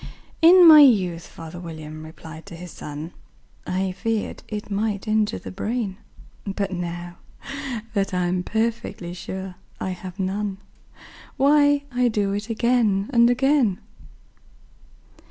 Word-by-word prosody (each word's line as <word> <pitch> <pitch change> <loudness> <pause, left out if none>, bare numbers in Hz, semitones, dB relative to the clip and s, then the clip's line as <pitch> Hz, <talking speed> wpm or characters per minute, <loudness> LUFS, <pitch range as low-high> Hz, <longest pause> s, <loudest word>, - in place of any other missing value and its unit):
"In 350 +2 +8
my 310 -2 +11
youth," 190 - +4
father 165 +1 -10
William 155 -2 -8
replied 160 +1 -11
to 175 - -9
his 175 0 -9
son, 150 +3 -7 0.6
"I 185 +1 -1
feared 215 +4 -3
it 210 -1 -6
might 205 +1 -1
injure 215 -1 +1
the - - -8
brain; 210 -1 -3 0.5
But, 200 -1 -3
now 175 -1 -5 0.8
that 200 -2 0
I'm 180 0 0
perfectly 220 -4 -2
sure 190 +1 -6 0.3
I 185 - -2
have 185 +1 -8
none, 195 +1 -2 0.8
Why, 285 +1 +4
I 245 0 +2
do 205 -3 0
it 205 +3 -4
again 225 -3 +1
and 235 0 +6
again." 255 -5 +2
195 Hz, 125 wpm, -23 LUFS, 180-230 Hz, 0.8 s, my